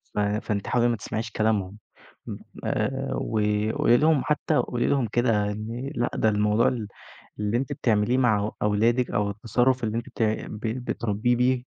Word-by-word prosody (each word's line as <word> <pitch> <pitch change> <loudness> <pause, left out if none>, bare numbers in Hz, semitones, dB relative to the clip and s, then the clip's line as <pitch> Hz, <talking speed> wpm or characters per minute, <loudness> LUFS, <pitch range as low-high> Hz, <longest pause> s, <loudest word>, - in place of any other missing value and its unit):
ف - - 0
فأنتِ 105 0 -1
حاولي 120 -1 +2
ما 120 - +1
تسمعيش 110 +2 -4
كلامهم 105 -3 0 0.9
آآ، 135 0 -1
وقولي 110 +2 +1
لهم 155 -1 +3
حتى 150 0 +1
قولي 120 -1 0
لهم 135 -4 +1
كده 110 -4 +1 0.4
لأ 120 - 0
ده 110 - +2
الموضوع 105 +2 +2
ال 115 -5 -2 0.5
اللي 105 +2 0
أنتِ 130 +1 -2
بتعمليه 115 +2 +1
مع 110 -4 +2
أولادِك 115 +4 +2
أو 105 -1 0
التصرف 120 +4 +1
اللي 110 0 -1
أنتِ 120 - -5
ت - - -2 0.3
بت 110 +2 -4
بتربيه 115 +2 0
بيه 125 0 +2
115 Hz, 155 wpm, -25 LUFS, 105-125 Hz, 0.9 s, لهم